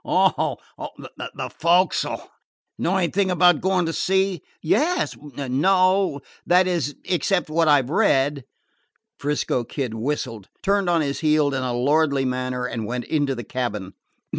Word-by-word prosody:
"Oh, - - +1 0.4
the - - -7
fo'c'sle. 175 +3 +2 0.5
Know 190 +3 +1
anything 190 +2 +1
about 175 -3 +4
going 185 -1 +1
to 165 - -2
sea?" 190 -2 +1 0.2
"Yes 335 - +1
no; 150 +5 +1 0.2
that 180 +1 +4
is, 165 -6 -1
except 180 -1 0
what 165 +1 +2
I 145 -3 +5
've 130 - -8
read." 145 - +2 0.8
'Frisco 145 -4 -1
Kid 125 -1 -4
whistled, 115 -4 -4
turned 200 -2 +1
on 170 -2 +3
his 140 -2 -2
heel 150 -2 +2
in 135 - -1
a 125 -1 -2
lordly 140 +1 +2
manner, 125 0 -2
and 115 -3 -4
went 120 0 -3
into 145 -3 0
the 120 - -6
cabin. 105 -5 -4
150 Hz, 140 wpm, -23 LUFS, 130-180 Hz, 0.8 s, I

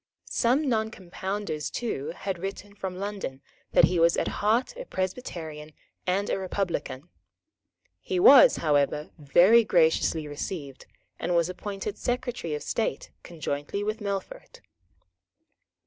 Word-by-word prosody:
Some 260 +6 +2
Noncompounders 200 - -3
too 215 - -3
had 190 -2 -4
written 195 +2 -6
from 190 -2 -5
London 195 -9 -5 0.3
that - - +6
he 180 - +4
was 170 +1 +4
at - - 0
heart 230 - +2
a - - -7
Presbyterian 165 - -5 0.3
and 195 +3 +1
a - - -1
republican. 175 -6 -3 0.9
He 375 -2 -2
was 485 +5 +8
however 150 -1 +1
very 180 +11 +6
graciously 160 -4 +2
received, 145 -2 -6 0.3
and 175 - -1
was 170 0 +2
appointed 200 +2 -5
Secretary 245 - -2
of 150 - -6
State 220 - -2
conjointly 155 +3 -4
with 215 +1 -2
Melfort. 200 -2 -5
185 Hz, 120 wpm, -27 LUFS, 160-210 Hz, 0.9 s, was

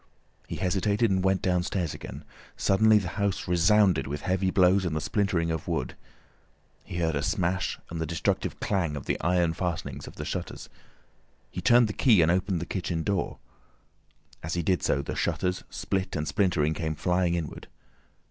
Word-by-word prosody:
He - - -5
hesitated 100 +4 +1
and 95 -1 +1
went 95 0 +1
downstairs 90 -2 0
again. 70 +5 -8 0.3
Suddenly 110 +2 +4
the 95 -3 -1
house 100 -2 -1
resounded 95 +2 +3
with 70 +1 -4
heavy 95 0 0
blows 95 +1 +4
and 85 -4 -2
the - - 0
splintering 90 -2 0
of 80 -1 -4
wood. - - -2 0.9
He 90 - -7
heard 80 -2 +1
a 70 - -1
smash 90 +3 -1
and 85 -1 -4
the 80 - -2
destructive 85 +2 -1
clang 85 -7 0
of 70 - -6
the - - -1
iron 85 -1 +2
fastenings 85 -2 -4
of - - -10
the - - -6
shutters. - - -5 0.8
He 90 - -5
turned 120 +4 +5
the 105 - -4
key 110 -10 +5
and 80 - +3
opened 90 0 0
the 85 - -4
kitchen 85 -3 -3
door. 100 -1 -1 1.0
As 80 +2 -3
he 85 - -1
did 90 +2 +1
so, 70 - +1
the - - -4
shutters, 90 0 -1
split 95 -1 -2
and 75 -1 -2
splintering, 85 -6 +1
came 80 0 -3
flying 90 +2 +1
inward. 80 -5 -5
90 Hz, 175 wpm, -27 LUFS, 80-95 Hz, 1.0 s, turned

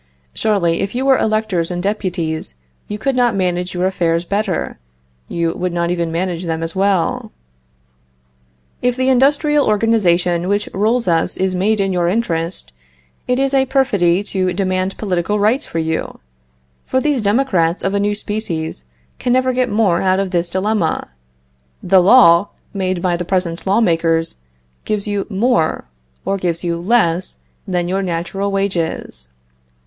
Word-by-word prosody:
Surely, 180 -6 +1
if 200 - -3
you 260 +2 -1
were 270 -1 +5
electors 215 -6 0
and 175 -1 -3
deputies, 175 - -2 0.3
you 210 - -4
could 270 +4 -1
not 245 -3 +2
manage 180 -1 -1
your 180 +1 0
affairs 170 -2 0
better; 200 - -2 0.5
you 170 -1 -1
would 180 0 -2
not 170 0 -1
even 170 -2 -1
manage 175 +1 -2
them 165 -1 -2
as 165 +2 -3
well. 190 -3 0 1.5
If 245 0 +1
the 260 +1 +1
industrial 285 +3 +3
organization 180 -5 +2
which 205 +1 0
rules 220 +3 +1
us 165 0 +1
is 190 0 0
made 205 +4 +1
in 195 -1 0
your 175 -1 +1
interest, 170 - -2 0.5
it 250 - +1
is 275 +1 0
a 265 -1 +3
perfidy 205 -9 +2
to 190 -3 -1
demand 185 0 -1
political 190 0 -1
rights 220 +6 +1
for - - -5
you; 160 0 -2 0.7
for 260 - +1
these 285 -2 0
democrats 200 -6 +1
of 195 - 0
a 200 - +1
new 205 +1 0
species 170 - -4 0.3
can 245 -1 0
never 255 0 +2
get 255 0 +1
out 190 -3 +2
of 195 -2 -2
this 175 -1 0
dilemma; 190 - -1 0.7
the 190 0 +5
law, 185 -3 +6 0.3
made 185 -3 -2
by 180 -2 +2
the 175 - -3
present 180 -1 -2
law 200 +4 +3
makers, 165 - +1 0.5
gives 210 -1 -2
you 205 -1 -2
more, 195 - +1 0.4
or 195 - 0
gives 170 -2 -2
you 170 -1 -1
less, 185 -4 +1 0.3
than 180 -2 -1
your 190 +2 0
natural 190 +3 -2
wages. 170 - -2
190 Hz, 155 wpm, -18 LUFS, 170-215 Hz, 1.5 s, law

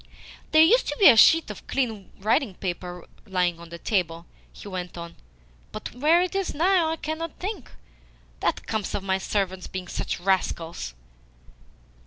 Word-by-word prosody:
"There 315 0 +7
used 470 +10 +4
to - - -3
be 395 - +9
a 245 - +7
sheet 320 +3 +6
of 205 - -11
clean 225 -7 -2
writing 215 +1 +1
paper 180 -1 -5 0.2
lying 180 -3 0
on 170 0 -11
the 170 - -8
table," 170 -4 -1 0.3
he - - -12
went 180 -2 -6
on. 170 0 -8 0.6
"But - - -7
where 310 +8 +4
it 365 - -3
is 390 -1 -2
now 345 +1 +3
I 320 - -1
cannot 315 +1 -5
think. 390 - -5 0.7
That - - -1
comes 215 -3 -2
of 195 - -3
my 190 -1 0
servants 190 -2 -2
being 185 -1 -6
such - - -3
rascals." 170 - -1
200 Hz, 165 wpm, -25 LUFS, -, 0.7 s, be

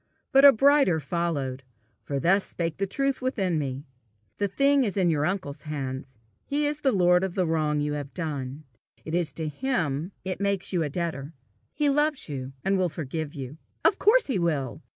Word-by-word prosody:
But 270 +1 +7
a 280 - +11
brighter 275 - +4
followed; 145 -6 -2 0.4
for 140 -1 -3
thus 190 +7 +3
spake 165 -2 -3
the 195 +1 -1
truth 275 +6 -1
within 195 - 0
me: 135 0 -4 0.5
"The 200 - +1
thing 275 +7 +3
is 205 -3 -2
in 180 -3 +3
your 150 -1 +1
uncle's 180 -7 -3
hands; 135 -4 -5 0.3
he 295 +1 0
is 295 0 -2
the 270 - +3
lord 180 -3 +4
of 190 -2 -3
the 185 - +1
wrong 155 -2 0
you 150 0 -1
have 145 -1 -5
done; 145 -4 -4 0.4
it 160 - -5
is 170 -4 +1
to 160 +1 -3
him 165 - -1
it 185 +1 -3
makes 200 -1 0
you 175 - +2
a 150 - -1
debtor: 160 -2 -4 0.4
he 295 - 0
loves 295 +1 +1
you, 135 -2 -5
and 195 0 +2
will 180 -1 +2
forgive 155 0 -5
you. 140 +2 -7 0.3
Of 395 - +4
course 450 +4 +5
he 255 -9 -1
will! 145 -9 -1
170 Hz, 195 wpm, -26 LUFS, 145-200 Hz, 0.5 s, a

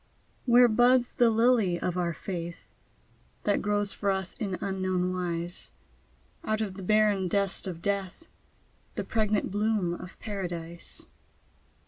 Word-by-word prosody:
Where 245 0 +7
buds 245 +2 +4
the 240 -1 +4
lily 225 -6 +3
of 180 - -2
our 175 -1 0
Faith? 170 0 -6 0.7
That 205 - +2
grows 205 -1 0
for 200 - -1
us 190 -1 -1
in 195 -5 -2
unknown 185 -1 -1
wise, 175 -1 -2 0.7
Out 215 -8 0
of 210 -4 -2
the 195 - -9
barren 210 -1 +3
dust 195 +1 0
of 170 -3 -6
death, 200 - -2 0.7
The - - -2
pregnant 215 -3 0
bloom 205 -3 +1
of 180 +1 -9
Paradise. 175 -5 -6
195 Hz, 130 wpm, -28 LUFS, 180-215 Hz, 0.7 s, Where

